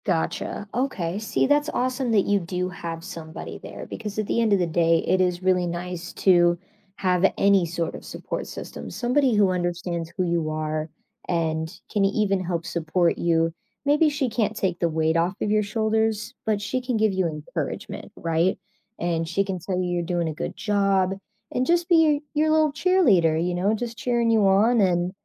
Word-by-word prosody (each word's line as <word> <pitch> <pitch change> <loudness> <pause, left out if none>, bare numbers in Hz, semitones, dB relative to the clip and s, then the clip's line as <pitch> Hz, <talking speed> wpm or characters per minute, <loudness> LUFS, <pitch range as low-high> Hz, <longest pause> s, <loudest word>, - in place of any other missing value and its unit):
Gotcha. 185 +3 -2
Okay, 205 -8 -1
see 215 - 0
that's 290 +2 +2
awesome 255 -2 -1
that 205 -3 +3
you 205 0 +2
do 180 +1 -3
have 165 -2 -6
somebody 165 -4 -8
there - - -8
because 210 -2 -6
at 215 - 0
the 235 - 0
end 225 -2 +2
of 200 - +5
the 180 - +2
day, 165 0 +2
it 185 +2 +3
is 180 0 0
really 180 -1 +2
nice 175 0 -5
to 175 -2 +4 0.4
have 185 0 +2
any 200 -2 +4
sort 165 0 -3
of - - -9
support - - -5
system. - - -8
Somebody 255 0 +1
who 200 -2 +4
understands 175 -2 -2
who 185 - +1
you 170 -2 0
are, 155 0 -2 0.4
and 160 -2 -1 0.2
can 205 - +1
even 195 -1 +1
help 170 -2 -3
support 170 +1 0
you. 165 -1 +2 0.3
Maybe 295 +2 +4
she 285 -2 -1
can't 220 -2 -1
take 185 -4 -1
the 170 - +1
weight 160 0 +1
off 175 +3 +1
of 210 - -1
your 215 0 +3
shoulders, 220 0 0
but 215 -2 +2
she 220 +5 -2
can 250 -2 -1
give 215 -2 +2
you 185 -2 +1
encouragement, 150 -2 -5
right, 165 +3 0 0.4
and 165 -1 -1
she 185 +4 +1
can 190 -2 -4
tell 185 +1 -3
you 180 - -1
you're 175 -1 0
doing 175 -1 -1
a 160 - -2
good - - -5
job 195 -3 +1 0.4
and 250 - 0
just 345 0 +2
be 350 - +5
your 305 -3 +4
your 310 +1 +2
little 310 -2 +3
cheerleader, 245 - +3
you 180 0 -1
know, 195 +5 +1
just 230 +1 -5
cheering 235 -2 +1
you 215 -3 +4
on, 215 +4 +4
and 180 -2 +2
190 Hz, 195 wpm, -24 LUFS, 170-220 Hz, 0.4 s, of